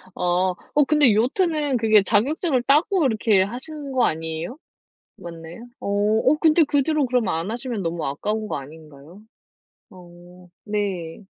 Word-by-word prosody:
어 180 +1 0 0.3
근데 295 -7 +5
요트는 290 - +1
그게 220 -2 +4
자격증을 255 - +1
따고 305 +9 +2
그렇게 220 - +2
하신 275 +8 -5
거 260 -2 +2
아니에요? 160 - -4 0.6
맞나요? 170 +6 -10
어 - - -7 0.4
어 300 +3 +4
근데 320 0 +5
그 280 -1 +1
뒤로 305 -2 0
그럼 250 -3 0
안 165 +6 -2
하시면 235 -4 -4
너무 165 -1 -3
아까운 210 +10 -3
거 - - -3
아닌가요? 150 +4 -13 0.7
어 180 0 -16 0.2
네. 200 -4 -4
215 Hz, 275 characters per minute, -22 LUFS, 175-270 Hz, 0.7 s, 근데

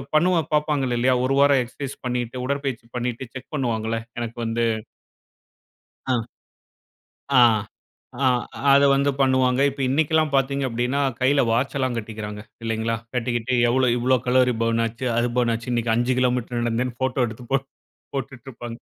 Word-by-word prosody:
பண்ணவ 175 +2 +4
பாப்பாங்க 150 -2 +1
இல்லையா, 125 +2 +3
ஒரு 135 - +1
வாரம் 140 -1 +5
எக்சர்சைஸ் 135 +3 -7
பண்ணிட்டு, 125 0 -2
உடற்பயிற்சி 135 -4 -3
பண்ணிட்டு 125 +1 -3
செக் 130 +3 -9
பண்ணுவாங்கள்ல, 115 -4 -1 0.2
எனக்கு 115 0 -5
வந்து 115 +1 -1 1.4
ஆ 125 -4 0 1.1
ஆ, 125 - +8 0.8
ஆ - - +4 0.5
அதை 140 0 +6
வந்து 140 +1 +2
பண்ணுவாங்க. 130 -1 +3
இப்ப 140 0 -7
இன்னிக்கலாம் 155 +3 +1
எல்லாம் 155 -3 +1
பாத்தீங்க 135 +1 +1
அப்படின்னா, 125 +4 -1 0.2
கையில 140 +2 +4
வாட்ச் 130 +5 0
எல்லாம் 130 -2 0
கட்டிக்கிறாங்க. 105 -2 -6 0.2
இல்லைங்களா, 115 0 -1 0.2
கட்டிக்கிட்டு 120 +1 -1
எவ்ளோ, 130 +1 +2
இவ்வளோ 130 +2 +3
கலோரி 125 0 +4
பர்ன் 115 0 +1
ஆச்சு, 115 +3 -4
அது 120 +1 +2
பர்ன் 120 -2 +2
ஆச்சுன்னு, 120 +2 -4
இன்னைக்கு 115 -1 +1
5 120 +2 +1
கிலோமீட்டர் 125 -1 0
நடந்தேன்னு 120 +1 -2
போட்டோ 130 -1 +1
எடுத்து 115 +2 -9
போட் 135 0 +1 0.5
போட்டுட்ருப்பாங்க. 120 -3 -6
125 Hz, 145 wpm, -23 LUFS, 120-135 Hz, 1.4 s, ஆ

